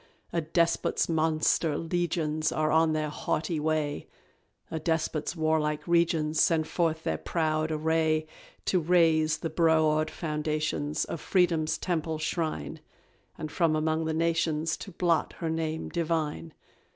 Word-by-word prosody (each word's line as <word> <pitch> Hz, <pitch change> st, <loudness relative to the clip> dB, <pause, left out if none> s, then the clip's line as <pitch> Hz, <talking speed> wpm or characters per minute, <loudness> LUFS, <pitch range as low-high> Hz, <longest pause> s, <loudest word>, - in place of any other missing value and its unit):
A 170 Hz, -, +1 dB
Despot's 170 Hz, +2 st, +1 dB
monster 160 Hz, -1 st, +1 dB
legions 165 Hz, -2 st, -1 dB
Are 155 Hz, 0 st, 0 dB
on 160 Hz, 0 st, +4 dB
their 155 Hz, -1 st, -1 dB
haughty 155 Hz, +2 st, -2 dB
way; 150 Hz, -1 st, -1 dB, 0.6 s
A 160 Hz, -, -2 dB
Despot's 160 Hz, 0 st, -1 dB
warlike 155 Hz, -1 st, 0 dB
regions 165 Hz, -2 st, +2 dB
Send 160 Hz, -2 st, +2 dB
forth 165 Hz, -2 st, 0 dB
their -, -, -1 dB
proud 155 Hz, -1 st, -1 dB
array, 155 Hz, 0 st, +1 dB, 0.4 s
To 185 Hz, -, +2 dB
raze 160 Hz, -2 st, +3 dB
the 165 Hz, -, -4 dB
broad 155 Hz, -2 st, +3 dB
foundations 150 Hz, -1 st, -2 dB
Of 165 Hz, -, -6 dB
Freedom's 170 Hz, -4 st, +1 dB
Temple 160 Hz, -3 st, -2 dB
shrine, 155 Hz, -, -3 dB, 0.6 s
And 155 Hz, -, -5 dB
from 165 Hz, -2 st, +2 dB
among 160 Hz, +1 st, 0 dB
the 160 Hz, -, -1 dB
nations 165 Hz, -1 st, +1 dB
To 200 Hz, -, -9 dB
blot 170 Hz, -2 st, +1 dB
her 165 Hz, -1 st, -3 dB
name 160 Hz, 0 st, -2 dB
divine. 155 Hz, -, -2 dB
160 Hz, 130 wpm, -28 LUFS, 155-165 Hz, 0.6 s, on